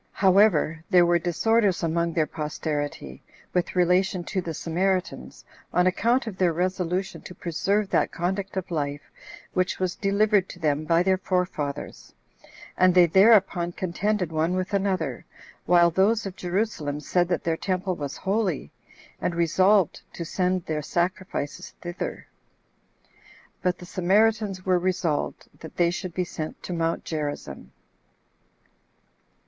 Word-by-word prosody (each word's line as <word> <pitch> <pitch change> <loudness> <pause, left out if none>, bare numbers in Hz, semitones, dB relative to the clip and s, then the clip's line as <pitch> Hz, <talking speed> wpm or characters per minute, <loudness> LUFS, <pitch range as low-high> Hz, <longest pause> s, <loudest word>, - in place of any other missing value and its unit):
However, 185 -5 +3
there 180 -3 +6
were 170 0 +3
disorders 195 +3 +1
among 170 +1 0
their 160 -2 +2
posterity, 150 - -4 0.3
with 180 0 -1
relation 180 +1 +2
to 185 +2 -2
the 170 - -5
Samaritans, 185 +4 -2 0.3
on 180 - +3
account 235 +8 +2
of 215 -5 -6
their 180 -2 +3
resolution 180 +2 -2
to 180 - -11
preserve 195 +5 0
that - - +2
conduct 190 +3 -3
of 185 -1 -4
life 145 -2 -3 0.4
which 185 0 0
was 185 -1 -1
delivered 200 -1 +2
to - - -9
them 155 -2 0
by 165 +2 +3
their 190 0 +2
forefathers, 180 -7 -3 0.6
and 185 0 +4
they 180 -1 +8
thereupon 190 -1 +4
contended 185 0 -1
one 160 +3 0
with 185 +2 -3
another, 185 -9 -1 0.4
while 175 -1 +5
those 205 +6 +2
of 190 -2 -6
Jerusalem 175 -6 -2
said 175 +4 +1
that 175 - -1
their 165 -1 0
temple 185 +1 -2
was 145 -3 -5
holy, 190 - -1 0.5
and 175 - -1
resolved 185 +3 +3
to 170 - -5
send 180 0 -1
their 155 -1 -2
sacrifices 175 -2 -3
thither; 175 +1 -5 1.4
but 180 -1 0
the 180 - -11
Samaritans 200 +2 +1
were 185 -1 +3
resolved 175 -4 -1
that 160 - -11
they 170 -1 +3
should 175 -1 -5
be 185 - +1
sent 155 -2 -6
to 180 - -4
Mount 165 -1 -1
Gerizzim. 150 -2 -5
180 Hz, 140 wpm, -25 LUFS, 165-190 Hz, 1.4 s, they